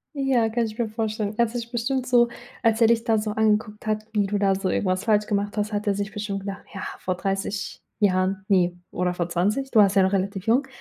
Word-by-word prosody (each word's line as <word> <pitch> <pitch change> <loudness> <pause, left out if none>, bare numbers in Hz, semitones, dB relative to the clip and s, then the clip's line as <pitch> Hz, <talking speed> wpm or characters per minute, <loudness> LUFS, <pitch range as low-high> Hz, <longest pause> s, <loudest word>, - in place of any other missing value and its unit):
Ja, 265 -5 +2
kann 235 +1 0
ich 215 -1 -7
mir 235 -2 -1
vorstellen. 215 -1 -2
Er 235 - +4
hat 225 - -11
dich 235 -1 -5
bestimmt 250 +2 -1
so, 240 -1 +4 0.4
als 225 0 +2
er 225 - +7
dich 230 0 +2
da 225 -2 +3
so 210 0 -2
angeguckt 215 0 0
hat, 215 0 -1
wie 205 -2 +1
du 205 +1 -1
da 195 -1 +2
so 190 0 -2
irgendwas 185 0 0
falsch 210 -2 +3
gemacht 205 0 -1
hast, 210 0 -1
hat 205 0 -3
er 200 - +2
sich 205 +1 -3
bestimmt 205 -1 -4
gedacht, 195 0 -7
ja, 195 - -6 0.2
vor 185 - -2
30 195 +2 -3 0.2
Jahren, 190 -1 +1
ne, 180 -2 +3
oder 180 0 -1
vor 175 -1 -2
20. 210 +11 0
Du 225 - +5
warst 200 -1 +5
ja 195 - +6
noch 190 - +2
relativ 195 +1 -2
jung. 260 +4 +3
210 Hz, 245 wpm, -24 LUFS, 195-225 Hz, 0.4 s, er